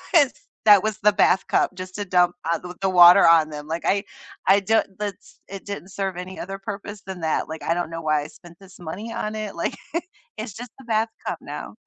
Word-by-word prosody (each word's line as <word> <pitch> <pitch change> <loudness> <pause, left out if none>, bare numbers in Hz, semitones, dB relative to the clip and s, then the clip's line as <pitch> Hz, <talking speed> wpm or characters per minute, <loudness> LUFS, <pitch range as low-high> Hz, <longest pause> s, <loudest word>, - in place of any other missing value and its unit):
Yes. 290 -6 +6 0.3
That 205 -3 +8
was 215 0 -2
the 210 - +5
bath 195 -2 +3
cup - - +2
just 185 0 -8
to 205 - -3
dump 180 -2 +3 0.2
ou 165 - -2
th 180 0 -8
the 195 - +2
water 180 +1 +8
on 165 -2 +5
them, 150 -1 -7
like, 165 +2 -3
I 200 +1 +1 0.4
I 195 +1 +6
don't 220 +3 +2
that's 205 -3 -6
it 195 -1 -8
didn't 195 -3 -6
serve 195 -2 -3
any 185 +1 -7
other 195 +2 -6
purpose 205 0 -7
than 185 -2 -7
that. 160 0 -1
Like, 160 0 -7
I 165 - +1
don't 175 -1 -2
know 165 0 -6
why 155 -1 +2
I 145 - -7
spent 170 -1 -16
this 195 -1 -16
money 180 +7 -6
on 215 0 -3
it, 215 -2 -5
like, 170 - -2 0.6
it's 215 -1 -6
just 240 +3 -8
the 265 - -13
bath 225 -1 +1 0.2
cup - - -2
now. - - -8
190 Hz, 235 wpm, -23 LUFS, 175-205 Hz, 0.6 s, That